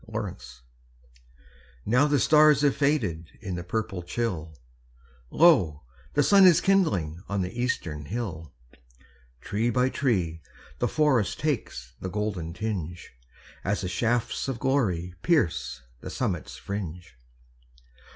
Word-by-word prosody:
At 110 - -13
Sunrise 65 - -6 1.2
Now 125 +7 +4
the 145 -1 +2
stars 150 -1 +5
have 145 -2 +3
faded 105 - 0
In 95 -5 -5
the 85 0 -4
purple 95 0 -3
chill, 85 -5 -3 0.7
Lo, 95 - +4 0.3
the 145 - +4
sun 195 +4 +7
is 175 - +6
kindling 95 - +1
On 100 -2 0
the 90 +5 -6
eastern 80 - -2
hill. 85 - -5 0.9
Tree 110 +4 -1
by 125 +2 +2
tree 90 - -1 0.4
the 120 - +1
forest 130 - +1
Takes 100 - -3
the 95 - -4
golden 100 -5 -3
tinge, 90 -4 -4 0.5
As 100 +2 -1
the 90 - -3
shafts 115 +9 -1
of 135 -3 -2
glory 110 -10 0
Pierce 75 - 0 0.2
the - - -8
summit's - - -3
fringe. 90 -4 -6
100 Hz, 125 wpm, -26 LUFS, 85-130 Hz, 1.2 s, sun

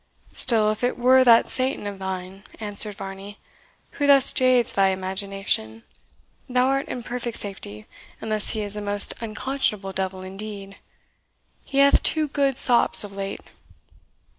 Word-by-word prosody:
"Still, 220 -4 +2
if 215 - -7
it 245 - -1
were 255 +1 +4
that 235 -2 +5
Satan 255 -4 -1
of 200 -1 -7
thine," 190 0 -7 0.2
answered 210 -1 -1
Varney, 195 +1 -9 0.5
"who 285 - -2
thus 275 -2 +6
jades 255 -2 +2
thy 195 -1 +2
imagination, 190 - -3 0.7
thou 250 +1 +1
art 275 +1 -1
in 245 - -6
perfect 240 0 -3
safety, 105 - -5 0.3
unless 215 -1 -2
he 215 - -2
is 205 0 -4
a 210 - -5
most 205 0 +3
unconscionable 215 -3 -3
devil 190 0 -4
indeed. 195 +1 -9 0.9
He 275 - -6
hath 280 0 +5
had - - -9
two 310 -1 +2
good 275 -2 0
sops 240 -3 +5
of 205 - -9
late." 195 0 -6
210 Hz, 150 wpm, -23 LUFS, 195-250 Hz, 0.9 s, thus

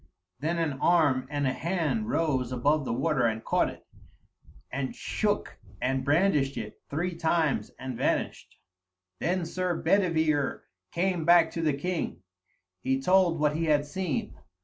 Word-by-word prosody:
Then 165 +3 -1
an 155 -5 -1
arm 150 -7 +3
and 145 -1 -1
a 130 - +1
hand 180 +8 -1
rose 135 - 0
above 140 +4 +1
the - - -2
water 130 0 +1
and 110 0 -3
caught - - +2
it, - - -12 0.9
and 130 0 -3
shook 210 -1 -2 0.2
and 130 +1 0
brandished 145 -2 +2
it - - -7
three 175 +5 -2
times 160 -3 +1
and 130 -1 -5
vanished. - - -2 0.6
Then 180 +1 0
Sir 180 +1 -1
Bedivere 160 -5 +1 0.3
came 180 -1 0
back 170 -1 +5
to 165 - -3
the 155 -3 +2
king; 140 - -3 0.6
he 130 +4 0
told 180 +2 +3
what 150 0 +2
he 165 +1 0
had 150 -2 +2
seen. 160 +1 -3
155 Hz, 150 wpm, -28 LUFS, 135-175 Hz, 0.9 s, back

